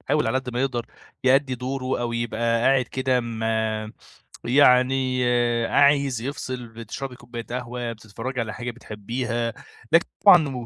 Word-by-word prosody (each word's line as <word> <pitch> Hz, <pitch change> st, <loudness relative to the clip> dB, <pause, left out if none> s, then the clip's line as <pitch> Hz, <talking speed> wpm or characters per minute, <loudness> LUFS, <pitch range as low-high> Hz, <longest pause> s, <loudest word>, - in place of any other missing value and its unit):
بيحاول 150 Hz, +2 st, 0 dB
على 130 Hz, -, +1 dB
قد 130 Hz, -1 st, -6 dB
ما 120 Hz, -, -1 dB
يقدر 125 Hz, -3 st, -1 dB, 0.4 s
يؤدي 135 Hz, 0 st, +3 dB
دوره 130 Hz, +1 st, -3 dB
أو 120 Hz, -1 st, -2 dB
يبقى 115 Hz, 0 st, 0 dB
قاعد 135 Hz, -1 st, +4 dB
كده 130 Hz, 0 st, 0 dB
م 115 Hz, -1 st, -5 dB, 1.0 s
يعني 130 Hz, 0 st, +4 dB, 0.4 s
عايز 140 Hz, -4 st, +3 dB
يفصل، 130 Hz, -2 st, -5 dB
بتشربي 115 Hz, +4 st, -7 dB
كوباية 120 Hz, -1 st, -8 dB
قهوة، 120 Hz, -1 st, -4 dB
بتتفرجي 115 Hz, +4 st, -6 dB
على 110 Hz, -1 st, -4 dB
حاجة 120 Hz, 0 st, -5 dB
بتحبيها، 115 Hz, +1 st, -4 dB, 0.4 s
لكن 165 Hz, +1 st, +5 dB, 0.2 s
طبعًا 145 Hz, -, +5 dB
125 Hz, 135 wpm, -24 LUFS, 115-130 Hz, 1.0 s, لكن